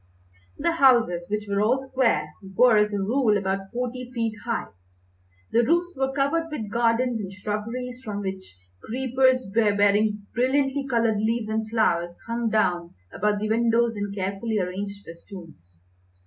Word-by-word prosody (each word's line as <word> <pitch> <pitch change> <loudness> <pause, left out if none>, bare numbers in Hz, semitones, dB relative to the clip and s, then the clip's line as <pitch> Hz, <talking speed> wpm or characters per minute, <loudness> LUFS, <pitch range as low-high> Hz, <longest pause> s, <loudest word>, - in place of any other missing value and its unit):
The 340 - +1
houses, 235 - +4
which 210 0 -2
were 200 0 0
all 260 +5 +1
square, 225 - +1 0.2
were, 245 0 +6
as 210 0 +3
a 205 - -1
rule, 215 +2 +2
about 195 0 -2
forty 250 +1 -4
feet 230 -3 -1
high. 230 -1 -1 0.9
The 235 - +4
roofs 345 +5 +1
were 265 0 0
covered 285 +4 0
with 220 -10 -5
gardens 235 +1 +1
and 195 -3 -5
shrubberies, 230 +5 -5
from 205 -3 -4
which 190 - -6 0.3
creepers, 260 +1 +1
bearing 205 0 +2
brillantly 270 +2 +1
coloured 230 -3 +2
leaves 220 +1 -1
and 220 0 -2
flowers, 175 -6 +1
hung 230 0 -1
down 180 -6 0 0.2
about 210 0 0
the 215 - -1
windows 230 +1 +2
in 205 -1 -3
carefully 200 +3 -2
arranged 200 +2 -4
festoons. 165 - -12
220 Hz, 150 wpm, -25 LUFS, 200-250 Hz, 0.9 s, were